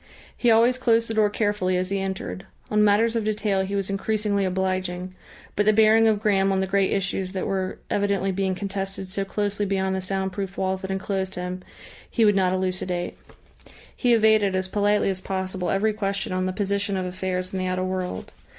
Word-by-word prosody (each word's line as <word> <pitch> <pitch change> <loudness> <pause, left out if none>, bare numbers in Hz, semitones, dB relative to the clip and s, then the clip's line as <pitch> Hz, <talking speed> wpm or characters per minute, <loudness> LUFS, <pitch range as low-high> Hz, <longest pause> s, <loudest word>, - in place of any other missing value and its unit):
He 240 - +2
always 235 +3 +4
closed 230 -2 +3
the 225 - -3
door 215 -1 +3
carefully 205 -3 0
as 185 +1 -1
he 195 - 0
entered. 190 0 -4 0.2
On 210 0 +4
matters 215 +3 +3
of 230 - 0
detail 210 -2 0
he 195 +1 -3
was 195 -1 -1
increasingly 200 0 0
obliging, 185 -1 -2 0.4
but 205 0 +1
the 215 - +6
bearing 220 +1 +5
of 215 -2 +2
Graham 195 -2 +2
on 190 - +1
the 190 - +1
great 195 0 +1
issues 190 -1 -1
that 190 - -2
were 190 -1 -2
evidently 200 -1 0
being 190 0 -1
contested 195 -1 -5
so 195 - 0
closely 205 +1 -2
beyond 190 -1 0
the 190 - -2
sound 190 +1 -2
proof 195 0 -5
walls 190 0 -1
that 190 - -5
enclosed 190 0 -2
him, 180 +1 -4 0.5
he 230 - +2
would 205 -1 +4
not 185 -2 +3
elucidate. 185 -1 -2 0.8
He 245 -1 +2
evaded, 215 -3 +4
as 185 0 -1
politely 205 0 +2
as 190 -1 -4
possible, 190 -1 -3
every 215 +3 +1
question 195 -3 -2
on 185 0 0
the - - -1
position 200 0 -1
of 185 - -2
affairs 185 0 -3
in 190 - -2
the 185 - -1
outer 185 0 -1
world. 185 - -4
195 Hz, 200 wpm, -24 LUFS, 185-205 Hz, 0.8 s, the